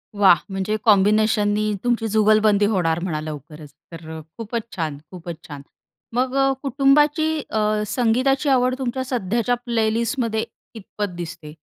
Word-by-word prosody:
वाह! 195 -5 +6
म्हणजे 195 +2 -1
कॉम्बिनेशननी 210 0 +3
तुमची 240 -2 0
जुगलबंदी 215 -1 +3
होणार 175 -6 +1
म्हणा 160 -5 -2
लवकरच. 150 0 -9 0.2
तर 160 -1 -8 0.2
खूपच 230 +1 -3
छान, 155 -5 -3
खूपच 175 -3 -8
छान. 145 -2 -8 0.5
मग 255 +2 0
अ, 270 0 +3
कुटुंबाची 295 +3 +3 0.2
अ, 215 -1 +1
संगीताची 255 +5 +1
आवड 255 -1 +3
तुमच्या 260 0 -2
सध्याच्या 235 -1 0
प्लेलिस्टमध्ये 230 0 0 0.3
कीतपत 205 -3 -6
दिसते? 165 -3 -8
215 Hz, 125 wpm, -22 LUFS, 180-245 Hz, 0.5 s, वाह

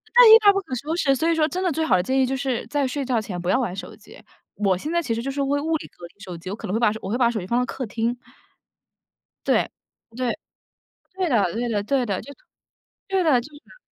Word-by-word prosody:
那 - - +9
一 - - +8
发 405 - +8
不 395 - +1
可 260 -8 -6
收 305 +7 -3
拾， 275 -5 +2
所 320 +6 0
以 335 - +3
说， 310 -1 +2
真 370 +3 -3
的 360 - +1
最 320 +2 -1
好 185 - +3
的 180 - 0
建 265 +1 0
议 260 - +4
就 265 +1 -2
是 260 -3 -2
在 285 -2 0
睡 280 +2 -3
觉 245 -3 0
前 180 -5 -5
不 180 - -3
要 255 - +3
玩 190 -7 -2
手 - - -8
机。 - - -16 0.4
我 195 -3 +1
现 305 - -5
在 340 0 +1
其 230 -7 -2
实 230 - -4
就 275 - -2
是 280 +1 -2
为 280 +1 +1
物 320 +2 0
理 - - -10
隔 175 - -13
离 - - -14
手 180 -3 -7
机， 185 +3 -7
我 - - -3
可 220 - -8
能 190 - -3
会 225 - +1
把 215 -3 +3
我 190 - -5
会 235 - 0
把 240 -2 +3
手 220 - -3
机 180 - -7
放 240 +3 +1
到 250 - +1
客 260 - -5
厅。 230 +3 -1 1.3
对。 - - +2 0.5
对。 250 -1 -1 0.8
对 370 -3 -1
的 205 -8 +2
对 235 +1 -2
的 205 -2 -1
对 260 +1 +1
的。 200 -4 -2
就 280 - -11 0.8
对 385 -1 +1
的， 265 -6 +4
就 245 - -10
是。 295 +11 -17
255 Hz, 300 characters per minute, -23 LUFS, 215-295 Hz, 1.3 s, 那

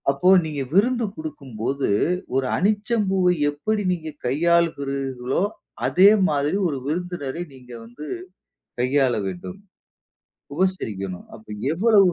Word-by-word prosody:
அப்போ 140 +6 +1 0.2
நீங்க 150 -3 -3
விருந்து 235 +5 +3
கொடுக்கும் 150 -6 -8
போது, 135 +4 0 0.5
ஒரு 135 0 +2
அனிச்சம் 210 +3 +1
பூவை 185 -2 +3 0.2
எப்படி 210 +9 -1
நீங்க 160 -3 -5 0.2
கையாள்கிறீர்களோ, 140 -3 +1 0.4
அதே 190 +3 +7 0.2
மாதிரி 145 +4 +1
ஒரு 145 -4 -2
விருந்தினரை 175 -1 -3
நீங்க 125 -2 -15
வந்து 120 +6 -10 0.8
கையாள 130 0 +2
வேண்டும். 95 - -7 1.0
உபசரிக்கணும். 110 - -2
அப்ப 110 - -15 0.3
எவ்ளோ 210 +5 +4
150 Hz, 110 wpm, -23 LUFS, 135-185 Hz, 1.0 s, அதே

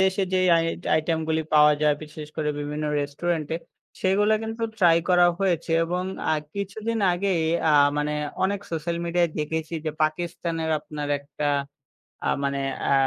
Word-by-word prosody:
দেশে 190 +1 +2
যে 185 - +3 0.2
I 165 - +2 0.3
item 160 +1 +1
গুলি 160 0 +1
পাওয়া 150 0 +7
যায় 150 -1 +4
বিশেষ 150 0 -8
করে 155 -2 -1
বিভিন্ন 150 +1 -3 0.2
রেস্টুরেন্ট 155 +3 -2
এ - - +1 0.4
সেগুলা 205 +3 +3
কিন্তু 225 +1 -5 0.2
ট্রাই 170 -3 +6
করা 180 -1 +6
হয়েছে 175 -4 0
এবং 180 +2 -2 0.3
আ - - +3 0.2
কিছুদিন 215 +3 -3
আগেই 180 -1 0 0.3
আ - - +4 0.2
মানে 150 0 0 0.3
অনেক 200 +1 0
সোশ্যাল 165 +1 -2
মিডিয়ায় 170 0 +1
দেখেছি 160 +2 -3
যে 155 - 0
পাকিস্তানের 165 0 -1
আপনার 150 -1 -6
একটা 140 +1 -5 0.8
আ - - +3
মানে 140 0 -1 0.3
আ - - +4
165 Hz, 155 wpm, -25 LUFS, 150-185 Hz, 0.8 s, পাওয়া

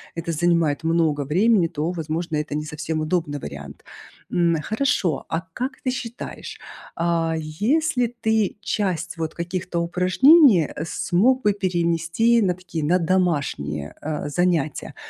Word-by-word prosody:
это 165 0 -3
занимает 165 -2 +1
много 160 -3 +1
времени, 185 - +3
то, 160 +1 -3
возможно, 165 -1 -3
это 150 -1 -3
не 150 - -2
совсем 155 +1 -3
удобный 155 -2 -1
вариант. 70 - -9 0.5
М, 170 -1 +2
хорошо, 215 - 0
а 160 - -1
как 255 +7 -4
ты 255 - 0
считаешь, 240 -2 -7 0.4
а, 165 -1 0
если 240 - 0
ты 220 -3 +1
часть 185 -4 -2
вот 160 -1 -4
каких-то 175 0 -3
упражнений, 185 - +5
э, 150 - -4
смог 230 - +1
бы 210 - +3
перенести 175 +4 +1
на 185 -4 +2
такие, 175 -3 -5
на 170 +5 +3
домашние, 145 - -1
э, 150 -1 -3
занятия? 165 -2 -1
170 Hz, 135 wpm, -23 LUFS, 155-195 Hz, 0.5 s, упражнений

